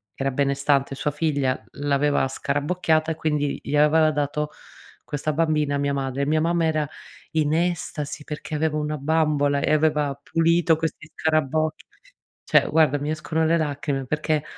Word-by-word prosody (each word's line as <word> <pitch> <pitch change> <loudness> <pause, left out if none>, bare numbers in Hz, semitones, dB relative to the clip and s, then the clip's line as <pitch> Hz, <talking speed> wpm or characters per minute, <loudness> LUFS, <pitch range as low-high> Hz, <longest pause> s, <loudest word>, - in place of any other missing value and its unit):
che - - -4
era 135 - +1
benestante 140 0 +1
sua 145 +2 -1
figlia, 145 -5 -1
l'aveva 145 -1 +1
scarabocchiata 155 +4 0
e - - -2
quindi 150 -2 -1
gli 150 - -2
aveva 155 +2 +5
dato 150 0 -1 0.5
questa 150 +1 -3
bambina 150 -2 +1
a - - +1
mia 140 0 0
madre. 135 0 -2
Mia 155 +1 +2
mamma 170 0 +1
era 155 -2 0 0.4
in 155 -2 +1
estasi, 160 -3 -2
perché 150 +1 -7
aveva 155 0 0
una 150 0 -2
bambola 145 -1 +1
e - - +1
aveva 150 -2 +2
pulito 165 0 +2
questi 160 0 -4
scarabocchi. 155 0 0 0.6
Cioè, - - +3
guarda 155 -3 +3
mi 145 +2 -3
escono 155 +1 -1
le 165 +1 +3
lacrime, 145 -3 -2
perché 150 +2 -1
150 Hz, 155 wpm, -24 LUFS, 145-160 Hz, 0.6 s, aveva